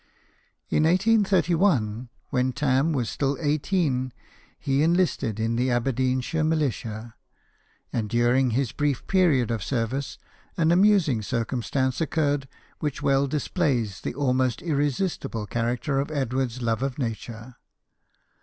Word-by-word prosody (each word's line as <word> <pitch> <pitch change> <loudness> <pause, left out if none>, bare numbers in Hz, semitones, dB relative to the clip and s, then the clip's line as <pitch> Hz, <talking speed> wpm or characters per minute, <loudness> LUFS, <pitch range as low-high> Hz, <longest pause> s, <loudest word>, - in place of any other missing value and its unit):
In 155 - +3
1831, 180 - +2 0.2
when 130 0 +1
Tarn 140 +3 +1
was 130 -7 -1
still 140 +3 -1
eighteen, 145 -4 0 0.5
he 140 -1 +1
enlisted 160 - +1
in 115 +1 0
the 125 +2 +1
Aberdeenshire 130 +4 0
militia, 120 -8 -2 0.8
and 110 -3 -1
during 120 +3 +3
his 120 +1 0
brief 145 -3 -1
period 155 - +3
of 110 -4 -2
service 130 +3 -2 0.4
an 165 -1 +3
amusing 180 - +4
circum 115 +3 -2
stance 130 +2 -1
occurred 145 -4 0 0.3
which 150 -4 -3
well 140 0 +3
displays 135 - -1
the - - -4
almost 130 -3 0
irresistible 145 - -1
character 120 +5 -1
of 140 - -2
Edward's 130 -3 -2
love 115 0 0
of 135 -2 -2
nature. 115 -1 -5
130 Hz, 120 wpm, -25 LUFS, 120-155 Hz, 0.8 s, amusing